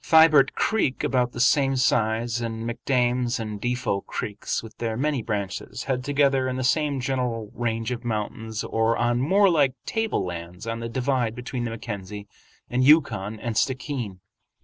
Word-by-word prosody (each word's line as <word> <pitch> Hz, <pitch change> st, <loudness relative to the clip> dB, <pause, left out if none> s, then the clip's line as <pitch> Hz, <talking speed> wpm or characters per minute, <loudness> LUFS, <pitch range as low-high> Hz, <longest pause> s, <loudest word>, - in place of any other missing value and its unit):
Thibert 160 Hz, -4 st, +6 dB
Creek, 210 Hz, -12 st, 0 dB
about 125 Hz, -2 st, +1 dB
the -, -, -6 dB
same 135 Hz, +2 st, +3 dB
size, 115 Hz, -1 st, +1 dB
and 115 Hz, 0 st, -4 dB
McDames 125 Hz, 0 st, 0 dB
and 105 Hz, -2 st, -5 dB
Defot 120 Hz, -5 st, -1 dB
Creeks, 105 Hz, +1 st, -3 dB
with 115 Hz, -, -11 dB
their 115 Hz, -2 st, -2 dB
many 145 Hz, -1 st, 0 dB
branches, 100 Hz, -3 st, -4 dB
head 130 Hz, -2 st, -1 dB
together 140 Hz, -1 st, +2 dB
in 130 Hz, -, -2 dB
the 130 Hz, -, -2 dB
same 145 Hz, +1 st, +1 dB
general 125 Hz, -4 st, -2 dB
range 115 Hz, 0 st, -2 dB
of 120 Hz, -1 st, -4 dB
mountains 110 Hz, -1 st, -3 dB
or 115 Hz, +1 st, +1 dB
on 120 Hz, +1 st, +1 dB
moor 195 Hz, +8 st, +4 dB
like 145 Hz, -7 st, +3 dB
tablelands 90 Hz, -, -3 dB
on 115 Hz, 0 st, -3 dB
the 115 Hz, 0 st, -4 dB
divide 125 Hz, -2 st, 0 dB
between 125 Hz, 0 st, -4 dB
the -, -, -2 dB
Mackenzie 105 Hz, -2 st, -6 dB, 0.4 s
and 125 Hz, +1 st, +1 dB
Yukon 115 Hz, -8 st, +3 dB
and 115 Hz, 0 st, -3 dB
Stickeen. 125 Hz, -7 st, -2 dB
120 Hz, 160 wpm, -25 LUFS, 110-135 Hz, 0.4 s, Thibert